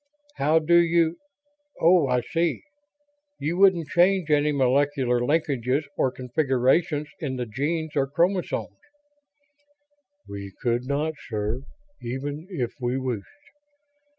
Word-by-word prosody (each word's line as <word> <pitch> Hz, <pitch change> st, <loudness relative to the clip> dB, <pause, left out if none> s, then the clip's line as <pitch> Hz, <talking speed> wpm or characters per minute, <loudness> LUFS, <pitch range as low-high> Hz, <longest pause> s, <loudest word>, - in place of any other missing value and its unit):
"How 150 Hz, +3 st, +3 dB
do 165 Hz, +2 st, +4 dB
you 170 Hz, -1 st, +3 dB, 0.6 s
oh, 170 Hz, -3 st, +5 dB
I 125 Hz, -1 st, +1 dB
see. 165 Hz, +5 st, -1 dB, 0.7 s
You 165 Hz, +4 st, -2 dB
wouldn't 185 Hz, -5 st, +4 dB
change 175 Hz, -1 st, +3 dB
any 150 Hz, 0 st, +3 dB
molecular 135 Hz, -2 st, +2 dB
linkages 140 Hz, 0 st, 0 dB
or 130 Hz, -, +1 dB
configurations 135 Hz, +4 st, 0 dB
in 135 Hz, -4 st, -3 dB
the 125 Hz, -1 st, -3 dB
genes 155 Hz, +8 st, -3 dB
or 135 Hz, -2 st, +2 dB
chromosomes." 175 Hz, +6 st, -1 dB, 1.5 s
"We 100 Hz, -1 st, -8 dB
could 120 Hz, +1 st, 0 dB
not, 150 Hz, +3 st, -1 dB, 0.2 s
sir, 110 Hz, +2 st, -2 dB, 0.4 s
even 145 Hz, +6 st, -5 dB
if 130 Hz, -11 st, -3 dB
we 125 Hz, +1 st, 0 dB
wished. 125 Hz, -6 st, -3 dB
145 Hz, 115 wpm, -25 LUFS, 125-165 Hz, 1.5 s, oh